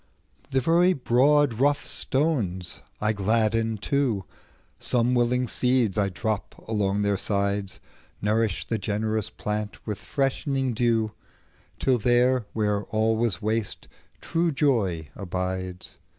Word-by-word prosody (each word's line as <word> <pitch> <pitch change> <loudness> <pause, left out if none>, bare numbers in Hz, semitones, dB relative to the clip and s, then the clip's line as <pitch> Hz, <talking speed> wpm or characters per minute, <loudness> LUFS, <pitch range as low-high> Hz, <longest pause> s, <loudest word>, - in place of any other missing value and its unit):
The 135 -1 +1
very 175 +6 +4
broad 135 -1 +3
rough 145 +2 +2
stones 115 - 0 0.2
I 105 +1 +1
gladden 110 +2 +1
too; 120 -4 0 0.6
Some 120 0 +1
willing 125 +1 +2
seeds 125 -4 +2
I 100 -2 +2
drop 105 +3 -3
along 105 -2 0
their 100 -1 +1
sides, 100 -1 -1 0.4
Nourish 105 -2 0
the 115 - -2
generous 110 +1 -1
plant 105 0 -4
with 105 -2 -4
freshening 135 +3 -1
dew, 115 -2 +1 0.7
Till 130 -2 +2
there 120 0 +3
where 105 -2 0
all 110 +1 +1
was 115 -1 -1
waste, 110 0 -2 0.3
true 165 0 0
joy 105 - +1
abides. 95 -1 -4
110 Hz, 120 wpm, -26 LUFS, 100-125 Hz, 0.7 s, very